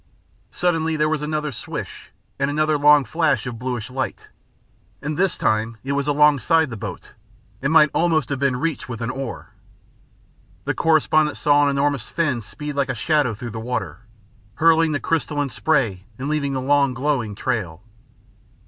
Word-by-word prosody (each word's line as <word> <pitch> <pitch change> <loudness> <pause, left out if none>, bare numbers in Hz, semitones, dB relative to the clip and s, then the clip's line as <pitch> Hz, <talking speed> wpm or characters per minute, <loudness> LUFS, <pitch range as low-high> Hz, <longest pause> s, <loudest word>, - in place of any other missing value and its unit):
Suddenly 160 +3 0
there 155 0 +2
was 155 -1 -1
another 150 0 -2
swish 120 - -7 0.3
and 140 0 +1
another 155 +1 +1
long 145 -1 +5
flash 160 +6 +1
of 120 -3 -6
bluish 125 -1 -4
light, 130 0 -4 0.7
and 150 +1 -4
this 185 +2 +1
time 110 +1 0
it 135 - -3
was 140 0 -1
alongside 150 +1 +3
the - - -4
boat, 105 - -7 0.5
and 140 +3 0
might 150 -2 +6
almost 160 -6 +1
have 140 -2 -2
been 140 -2 +1
reached 140 -1 -3
with 120 -2 -5
an 115 +2 -2
oar. 135 -3 -6 1.1
The - - 0
correspondent 155 -1 +2
saw 145 0 +4
an - - +3
enormous 140 -3 0
fin 140 -8 0
speed 150 +7 -7
like 140 -1 0
a - - -1
shadow 145 -8 +1
through 120 +2 -7
the 110 - -6
water, 125 0 -4 0.6
hurling 165 +1 +4
the 145 - -1
crystalline 145 -2 -1
spray 120 -12 0
and 135 - -4
leaving 145 -2 -1
the 130 - -2
long 140 -1 +2
glowing 130 -6 -1
trail. 100 -8 -3
140 Hz, 165 wpm, -22 LUFS, 125-155 Hz, 1.1 s, might